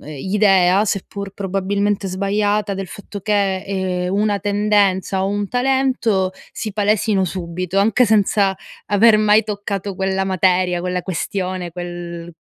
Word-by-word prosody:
ehm, - - -13
idea, 190 +4 +3
seppur 200 0 -4
probabilmente 200 +1 -1
sbagliata, 205 +2 0
del 195 0 -5
fatto 205 0 -9
che, 200 -2 0
ehm, 185 -2 -2
una 205 0 +1
tendenza 200 -2 +1
o 195 - 0
un 205 0 -1
talento 250 -7 +1 0.2
si 215 -3 -5
palesino 205 -1 +1
subito, 180 +1 -3
anche 225 +5 +4
senza 205 -2 +2 0.3
aver 215 +2 +5
mai 215 0 +4
toccato 200 -2 -4
quella 190 0 -1
materia, 185 -1 +1
quella 180 0 -2
questione, 185 0 -3
quel 175 -1 -7
195 Hz, 130 wpm, -19 LUFS, 185-205 Hz, 0.3 s, aver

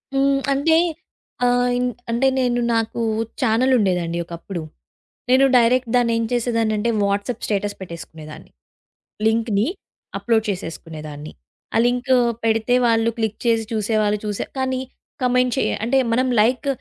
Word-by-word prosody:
హ్మ్. 275 0 +3
అంటే 320 +4 +3 0.7
ఆహ్, 245 0 +2
ఇన్ 250 0 0 0.3
అంటే 240 +3 +2
నేను 245 -1 +1 0.2
నాకు 225 +1 -1 0.4
ఛానెల్ 255 +2 +2
ఉండేదండి 180 -5 0
ఒకప్పుడు. 170 +1 -7 0.7
నేను 260 +2 +5
డైరెక్ట్ 245 +1 +3
దాన్ని 240 -1 +3
ఏం 230 - 0
చేసేదాన్నింటే, 230 -2 0
వాట్సాప్ 200 +4 -1
స్టేటస్ 205 -1 -1
పెట్టేసుకునేదాన్ని. 160 -4 -10 0.8
లింక్‌ని 220 -2 +1 0.5
అప్‌లోడ్ 225 -2 +1
చేసేసుకునేదాన్ని. 155 -5 -6 0.4
ఆ - - +4
లింకు 250 +2 +2 0.3
పెడితే 225 +2 +2
వాళ్ళు 225 -1 +3
క్లిక్ 220 -2 -2
చేసి 230 -1 +2
చూసేవాళ్ళు 215 -1 +1
చూసే 205 -2 -3
కానీ, 260 0 -1 0.4
కామెంట్ 250 0 +2
చేయ - - +1
అంటే 255 +4 +2 0.2
మనం 255 +2 +2
లైక్ 250 +6 +1
230 Hz, 125 wpm, -21 LUFS, 205-250 Hz, 0.8 s, నేను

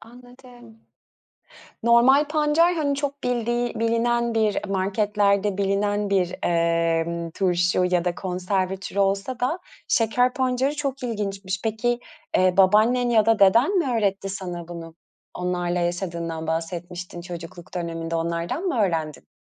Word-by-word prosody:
Anladım. 245 -1 -16 1.0
Normal 255 +5 +5
pancar, 310 +3 +3
hani, 290 -3 0
çok 280 0 -4
bildiği 240 0 -1
bilinen 235 +1 +1
bir 215 -2 +2
marketlerde 200 +1 +1
bilinen 205 +1 0
bir, 185 -3 +1
eee, 170 0 0
turşu 180 -1 +1
ya 180 -1 +1
da 175 - 0
konserve 185 +1 -2
türü 195 +1 -7
olsa 200 +6 0
da 260 +8 0 0.3
şeker 245 +2 +2
pancarı 260 +2 0
çok 275 -2 -3
ilginçmiş. 200 -5 -3
Peki, 235 +2 0 0.4
eee, 185 -1 +3
babaannen 220 +6 +4
ya 220 -2 +4
da 225 -1 +4
deden 230 - +5
mi 285 -8 0
öğretti 200 -3 0
sana 180 -3 -6
bunu? 165 -1 -8 0.4
Onlarla 180 -1 -1
yaşadığından 170 -2 -3
bahsetmiştin 175 +2 -4
çocukluk 170 -1 -9
döneminde. 165 -1 -4
Onlardan 170 - -2
mı 350 -10 -1
öğrendin? 160 -7 -1
200 Hz, 125 wpm, -24 LUFS, 175-240 Hz, 1.0 s, Normal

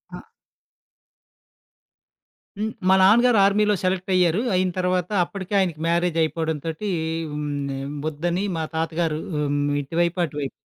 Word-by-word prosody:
ఆ! - - -8 2.4
హ్మ్. 220 +1 -2 0.2
మా - - +7
నాన్న 210 +5 +6
గారు 240 -3 +4
ఆర్మీలో 210 +1 +3
సెలెక్టయ్యారు. 185 0 +1
అయిన 185 0 +2
తరవాత 180 0 0
అప్పడికే 190 +2 -7
ఆయనకి 170 -5 -1
మ్యారేజయిపోవడంతోటీ 165 +1 -1 0.4
హ్మ్, 150 0 -4 0.3
ఆహ్, 135 +1 -5 0.2
ఒద్దని 175 +5 -2
మా 160 - -1
తాత 160 0 0
గారూ 155 -2 0 0.2
హ్మ్, 145 -1 0 0.2
ఇటువైపు, 170 +5 -1
అటువైపు 145 -3 -5
175 Hz, 120 wpm, -23 LUFS, 155-190 Hz, 2.4 s, మా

